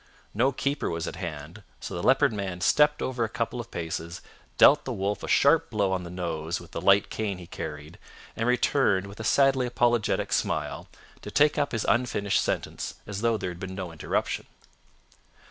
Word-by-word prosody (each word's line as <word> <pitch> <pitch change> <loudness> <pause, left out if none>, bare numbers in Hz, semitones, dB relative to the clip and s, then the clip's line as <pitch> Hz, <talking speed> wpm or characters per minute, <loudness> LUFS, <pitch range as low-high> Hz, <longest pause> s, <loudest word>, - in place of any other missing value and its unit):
No 125 +6 +2
keeper 140 +2 -2
was 80 -1 -3
at - - -6
hand, 85 +2 -7 0.2
so - - -7
the 85 - -3
Leopard 135 +2 +4
Man 95 -4 -4
stepped 150 +10 +3
over 125 -2 -1
a 110 - -1
couple 115 +2 -3
of 115 - -12
paces, 85 +1 -5 0.4
dealt - - +7
the - - -4
wolf 100 +2 -2
a - - -6
sharp - - +4
blow 100 -3 0
on 95 -1 0
the 85 - -8
nose 85 -1 -3
with 85 - -14
the 85 - -5
light 100 +2 +4
cane 105 -4 -2
he 90 - -10
carried, 75 0 -8 0.4
and 115 - -1
returned 125 -5 +2
with 100 +2 -11
a - - -4
sadly 135 +1 +3
apologetic 120 -2 +1
smile - - -1 0.3
to - - -7
take 150 0 +3
up 145 - 0
his 115 - -2
unfinished 110 -5 +1
sentence - - -3
as 100 0 -5
though 115 -1 +2
there 90 -3 -4
had 85 - -10
been 95 0 -6
no 95 -3 -5
interruption. 80 - -2
100 Hz, 195 wpm, -27 LUFS, 90-120 Hz, 0.4 s, dealt